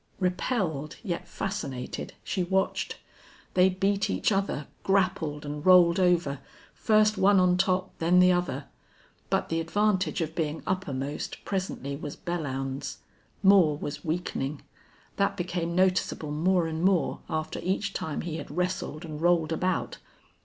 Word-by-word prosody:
Repelled, 180 - -1
yet 175 -6 -3
fascinated, 135 -10 -4
she 185 - -1
watched. 190 +2 0 0.6
They 185 +1 +5
beat 195 +2 0
each - - +1
other, 195 -7 0 0.2
grappled 180 -6 0
and 145 0 -5
rolled 180 -1 +6
over, 175 -7 +2 0.3
first 215 -1 +3
one 195 0 +5
on 180 -1 +4
top, 185 0 0
then 175 +2 +4
the 180 0 +6
other. 175 -6 -1 0.6
But - - 0
the 165 - 0
advantage 190 +4 +1
of 160 -1 -2
being 160 -1 -2
uppermost 145 -6 -3
presently 185 -8 -3
was 145 0 -6
Belllounds's. 135 -5 -3 0.5
Moore 190 -7 +6
was 145 0 -5
weakening. 155 -4 -3 0.5
That 200 0 +1
became 175 -1 -2
noticeable 185 -4 +1
more 175 +3 +2
and 160 0 -3
more 185 -3 +2
after 155 0 -3
each 195 +2 -1
time 155 - -3
he 165 -2 -4
had 145 - -7
wrestled 180 -1 -2
and 155 -1 -7
rolled 170 -2 +3
about. 185 +3 -1
175 Hz, 140 wpm, -28 LUFS, 155-185 Hz, 0.6 s, rolled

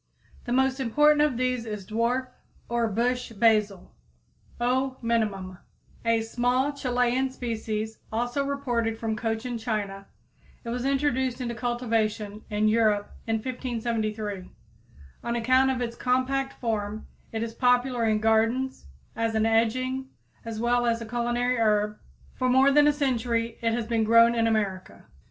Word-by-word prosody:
The 240 - -4
most 265 +1 +2
important 295 +4 +4
of 295 -5 +2
these 255 -1 0
is 210 -3 -5
dwarf 235 +5 0 0.4
or 235 -1 +1
bush 240 +4 -1
basil 210 -3 +2 0.7
(O. 260 +2 0
minimum, 215 -5 0
Linn.), 185 - -13 0.5
a 230 -1 +3
small 250 +5 0
Chilian 250 -1 0
species 220 -3 -4
also 245 +5 -1
reported 245 -5 -1
from 220 -1 -2
Cochin 225 +2 -3
China. 205 -3 -3 0.6
It 235 - -6
was 245 +2 -3
introduced 265 -2 0
into 240 -2 -3
cultivation 225 -3 -2
in 210 0 +1
Europe 215 -2 +2
in 225 - +1
1573. 220 -5 -3 0.7
On 235 0 -2
account 255 +3 +3
of 260 -2 -1
its 235 0 -4
compact 260 +2 0
form 215 -2 -2 0.3
it 225 0 -2
is 230 -1 -5
popular 245 0 +2
in 215 -1 +3
gardens 225 - +1 0.3
as 225 0 -1
an 220 0 +2
edging 255 +4 +1 0.3
as 225 -1 -5
well 240 +1 +2
as 230 -1 +1
a - - -5
culinary 240 +2 0
herb, 210 -1 +1 0.3
for 255 -1 0
more 265 +2 +5
than 295 +1 +5
a - - +6
century 235 -5 -1
it 230 -1 +1
has 235 -1 -1
been 225 -1 +1
grown 230 +1 +6
in 230 -1 +2
America. 200 -4 -2
235 Hz, 145 wpm, -26 LUFS, 220-255 Hz, 0.7 s, a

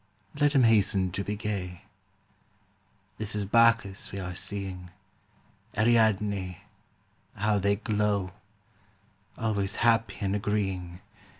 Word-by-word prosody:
Let 145 0 +2
him 135 -3 +5
hasten 100 -4 +3
to 100 +2 -3
be 105 +2 -3
gay! 95 -4 -4 1.4
This 110 -1 -1
is 105 -1 -1
Bacchus 115 -2 +3
we 100 - -6
are 90 -2 -4
seeing, 95 -1 -5 0.9
Ariadne 105 -5 +2 0.4
— - - -32
^how 105 -1 +2
they 100 +1 +2
glow 105 -3 -1 1.1
I - - -8
Always 100 -3 0
happy 115 -1 +2
and 100 0 0
agreeing. 95 -4 -2
100 Hz, 115 wpm, -28 LUFS, 95-110 Hz, 1.4 s, him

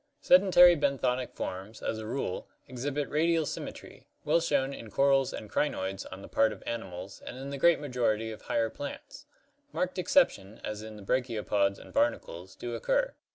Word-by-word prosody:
Sedentary 180 -1 +7
benthonic 130 -4 0
forms, 95 +4 -5
as 110 - -2
a 110 - -6
rule, 120 -6 -3 0.2
exhibit 140 +3 -3
radial 165 +1 +2
symmetry, - - -7 0.2
well - - +4
shown 140 -4 +1
in 115 -5 -9
corals 135 +4 +3
and 110 - -7
crinoids 95 -6 -2
on 95 +1 -8
the - - -9
part 110 0 +3
of 105 - -9
animals 95 -4 -6
and 125 - -8
in 135 +1 -6
the 140 - -4
great 170 +2 +5
majority 115 -6 0
of 110 - -9
higher 115 -1 0
plants. 145 - -8 0.4
Marked 185 -4 -2
exceptions, 110 - +2
as 105 0 -4
in 110 0 -8
the 105 - -11
brachiopods 105 -4 0
and - - -13
barnacles, 295 - -1
do - - -5
occur. - - 0
130 Hz, 170 wpm, -29 LUFS, 110-160 Hz, 0.4 s, Sedentary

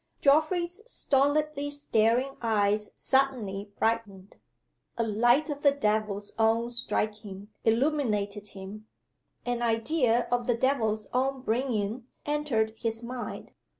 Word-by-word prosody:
(Geoffrey's 340 +6 +2
stolidly 290 +1 +1
staring 255 -2 +1
eyes 210 -2 +1
suddenly 230 -8 0
brightened. 210 -4 -2 0.6
A 230 - +1
light 240 +8 +3
of 285 0 -5
the 285 - +6
devil's 215 -6 -1
own 225 +2 +2
striking 210 -4 -3
illuminated 225 -5 +1
him. 205 +3 -9 0.6
An 245 -1 -1
idea 235 +1 +1
of 245 -1 0
the 240 -2 +2
devil's 220 -5 +1
own 265 +1 0
bringing 230 -1 -1 0.2
entered 290 -7 0
his 225 0 -2
mind. 235 -4 -6
235 Hz, 110 wpm, -28 LUFS, 215-275 Hz, 0.6 s, the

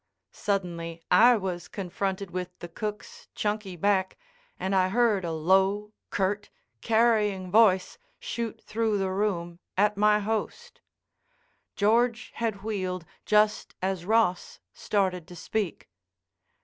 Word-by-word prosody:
Suddenly 170 -4 -3
I 235 +6 +7
was 180 -3 -4
confronted 195 0 -3
with 180 0 -5
the 175 - -8
cook's 210 +4 -6
chunky 210 -3 -2
back 190 +1 +1 0.4
and 190 +1 -1
I 185 -1 +3
heard 220 -2 +2
a 170 - -2
low, 190 +6 +2 0.2
curt, 205 +1 -1 0.3
carrying 215 -5 +2
voice 200 -4 +4 0.2
shoot 230 -2 -5
through 220 -1 0
the 190 -1 -1
room 175 -4 -2 0.2
at 210 +1 +3
my 210 0 +5
host. 225 - -4 0.9
George 235 +3 +2
had 220 -4 -3
wheeled 185 -5 -3 0.2
just 210 0 +2
as 190 -2 -2
Ross 210 -3 +1
started 185 -4 -1
to 180 - -11
speak. 200 0 -3
200 Hz, 120 wpm, -27 LUFS, 185-215 Hz, 0.9 s, I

